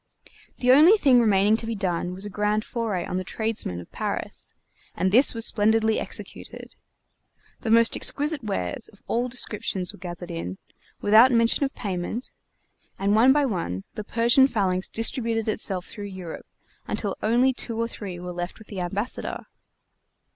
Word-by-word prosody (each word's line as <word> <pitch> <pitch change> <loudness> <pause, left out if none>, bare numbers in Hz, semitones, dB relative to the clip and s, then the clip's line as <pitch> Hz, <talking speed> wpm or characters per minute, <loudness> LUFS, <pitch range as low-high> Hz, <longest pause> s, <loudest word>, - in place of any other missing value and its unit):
The 250 0 +3
only 320 +11 +7
thing 270 -10 +5
remaining 210 -2 +4
to 225 - -4
be 230 - -2
done 180 -2 -2
was 190 +2 -4
a - - -5
grand 210 +2 0
foray 215 -7 -3
on 180 - -3
the 185 - -2
tradesmen 220 - -3
of 90 - -12
Paris, - - -4 0.4
and 185 - 0
this 250 +4 +5
was 230 0 +3
splendidly 220 0 +2
executed. - - -6 0.9
The 225 - -4
most 230 +1 +5
exquisite 295 -1 +1
wares 90 - -3
of 205 - -21
all 240 +2 -1
descriptions 205 -6 -2
were - - -14
gathered 175 0 -7
in, 95 - -5 0.4
without 220 +5 +6
mention 230 +3 +3
of 270 - -5
payment; 195 +4 -4 0.7
and 200 +1 +1
one 230 +5 +6
by 290 +1 +3
one 165 - -3
the 215 - -6
Persian 235 +5 +4
phalanx 190 -6 -1
distributed 225 -1 -1
itself 195 -4 0
through 205 - -8
Europe 185 -4 -8 0.4
until 200 -3 -3
only 245 +4 +3
two 230 -2 -5
or 230 - 0
three 195 -6 -7
were 180 0 -6
left 175 +1 -5
with 220 - -16
the 195 -3 -5
Ambassador. 200 +7 -3
215 Hz, 165 wpm, -25 LUFS, 185-235 Hz, 0.9 s, only